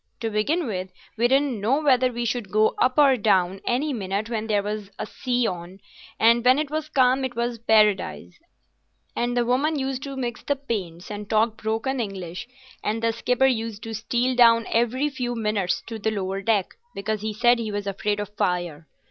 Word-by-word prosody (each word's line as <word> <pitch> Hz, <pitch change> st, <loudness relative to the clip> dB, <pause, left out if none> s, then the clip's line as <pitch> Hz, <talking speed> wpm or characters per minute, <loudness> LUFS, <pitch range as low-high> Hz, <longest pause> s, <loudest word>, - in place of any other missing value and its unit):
To 225 Hz, -1 st, -2 dB
begin 295 Hz, +11 st, 0 dB
with, 185 Hz, -5 st, -4 dB, 0.2 s
we 235 Hz, +2 st, +3 dB
didn't 265 Hz, -4 st, +1 dB
know 250 Hz, +8 st, +2 dB
whether 260 Hz, -4 st, +3 dB
we 240 Hz, 0 st, -3 dB
should 235 Hz, -4 st, -2 dB
go 215 Hz, +2 st, +3 dB
up 255 Hz, +2 st, +2 dB
or 280 Hz, -3 st, +6 dB
go -, -, -12 dB
down 190 Hz, -2 st, +2 dB
any 275 Hz, +5 st, 0 dB
minute 205 Hz, 0 st, -3 dB
when 220 Hz, -1 st, -2 dB
there 205 Hz, -2 st, +1 dB
was 210 Hz, -1 st, -4 dB
a -, -, -3 dB
sea 245 Hz, +2 st, -1 dB
on; 180 Hz, -1 st, -4 dB, 0.4 s
and 235 Hz, +1 st, +5 dB
when 255 Hz, +2 st, +5 dB
it 300 Hz, -1 st, -2 dB
was 310 Hz, 0 st, -3 dB
calm 260 Hz, -2 st, +3 dB
it 255 Hz, -2 st, -3 dB
was 235 Hz, 0 st, -2 dB
paradise; 215 Hz, -, +2 dB, 0.8 s
and 240 Hz, +1 st, -1 dB
the 240 Hz, -, +2 dB
woman 280 Hz, +6 st, +1 dB
used 265 Hz, -1 st, -2 dB
to 275 Hz, -1 st, -6 dB
mix 240 Hz, -3 st, -3 dB
the 285 Hz, -, 0 dB
paints 200 Hz, -10 st, -5 dB
and 205 Hz, 0 st, -6 dB
talk 220 Hz, +1 st, +2 dB
broken 225 Hz, +5 st, -2 dB
English, 190 Hz, -2 st, -5 dB, 0.4 s
and 225 Hz, +2 st, -2 dB
the 230 Hz, 0 st, +2 dB
skipper 250 Hz, +3 st, +1 dB
used 225 Hz, -4 st, -1 dB
to 225 Hz, -, -6 dB
steal 240 Hz, +3 st, 0 dB
down 230 Hz, -2 st, +6 dB
every 240 Hz, +5 st, +1 dB
few 250 Hz, -4 st, -3 dB
minutes 210 Hz, -5 st, -1 dB
to 225 Hz, -1 st, -6 dB
the 220 Hz, -, 0 dB
lower 195 Hz, -2 st, -3 dB
deck, 205 Hz, -3 st, +1 dB, 0.3 s
because 215 Hz, +1 st, -2 dB
he 215 Hz, 0 st, -2 dB
said 240 Hz, +3 st, +3 dB
he 220 Hz, -2 st, -3 dB
was 205 Hz, 0 st, -3 dB
afraid 205 Hz, +1 st, -2 dB
of 205 Hz, -1 st, -4 dB
fire. 175 Hz, -6 st, -2 dB
225 Hz, 200 wpm, -24 LUFS, 205-250 Hz, 0.8 s, or